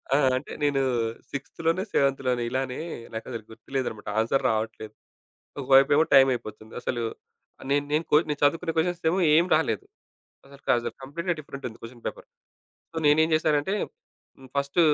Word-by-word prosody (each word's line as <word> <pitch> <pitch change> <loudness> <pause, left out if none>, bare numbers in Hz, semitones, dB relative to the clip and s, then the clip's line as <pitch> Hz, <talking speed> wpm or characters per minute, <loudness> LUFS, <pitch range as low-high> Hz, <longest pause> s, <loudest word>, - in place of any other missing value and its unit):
ఆ! - - +5 0.2
అంటే 135 - -7
నేను 140 -2 +2 0.5
సిక్స్త్‌లోనే, 165 +6 -2
సెవెంత్‌లోనే 135 -3 +1
ఇలానే 130 0 -2 0.4
నాకసలు 115 0 -5
గుర్తులేదన్నమాట. 110 -1 -4
ఆన్సర్ 115 +5 +1
రావట్లేదు. 110 -1 -3 0.7
ఒక 135 - -6
వైపేమో 140 +3 +6
టైమైపోతుంది. 120 -5 +3
అసలు 120 -2 -2 0.6
ఆహ్, - - -10
నేను 145 +1 +2
నేను 155 +2 +2
కో - - +8
నేను 150 -1 -2
చదువుకునే 165 +3 +2
క్వశ్చన్స్ 175 +2 0
ఏమో 180 - 0 0.2
ఏం 165 +2 +6
రాలేదు. 115 - +1 0.6
అసలు 140 0 -16
కసలు 120 0 +2
కంప్లీట్‌గా 170 +7 -2
డిఫరెంట్ 140 -2 -8
ఉంది 110 - -15
క్వశ్చన్ 115 +1 -11
పేపర్. - - -5 0.7
సో, - - -13
నేనేం 155 +2 +5
చేశానంటే, 155 +3 +2 0.6
హ్మ్. 130 -1 -14
ఫస్టు 140 +4 +1
135 Hz, 145 wpm, -26 LUFS, 120-155 Hz, 0.7 s, కో